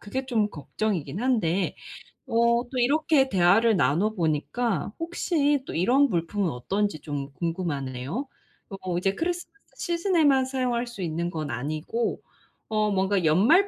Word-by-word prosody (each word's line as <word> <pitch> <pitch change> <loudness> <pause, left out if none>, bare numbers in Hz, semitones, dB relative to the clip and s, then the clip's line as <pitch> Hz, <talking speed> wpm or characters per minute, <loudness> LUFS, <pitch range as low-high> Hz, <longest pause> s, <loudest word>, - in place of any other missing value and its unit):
그게 260 +6 -4
좀 220 -5 +1
걱정이기는 165 - -3
한데 200 -8 +1 0.5
어 235 +1 +2
또 255 - -4
이렇게 285 +2 +3
대화를 200 +4 +4
나눠보니까 185 - 0
혹시 315 -4 0
또 - - -5
이런 240 +12 +4
물품은 175 +1 0
어떤지 190 +7 -2
좀 140 -2 -5
궁금하네요. 165 - -3 0.4
어 185 -3 -4
이제 195 +2 +1
크리스마스 350 - -3 0.3
시즌에만 335 -7 +2
사용할 250 -2 -1
수 235 -5 -8
있는 170 0 -2
건 155 -4 -4
아니고 155 - -2 0.5
어 215 -1 +2
뭔가 190 -1 +1
연말 230 - +5
205 Hz, 295 characters per minute, -26 LUFS, 165-255 Hz, 0.5 s, 연말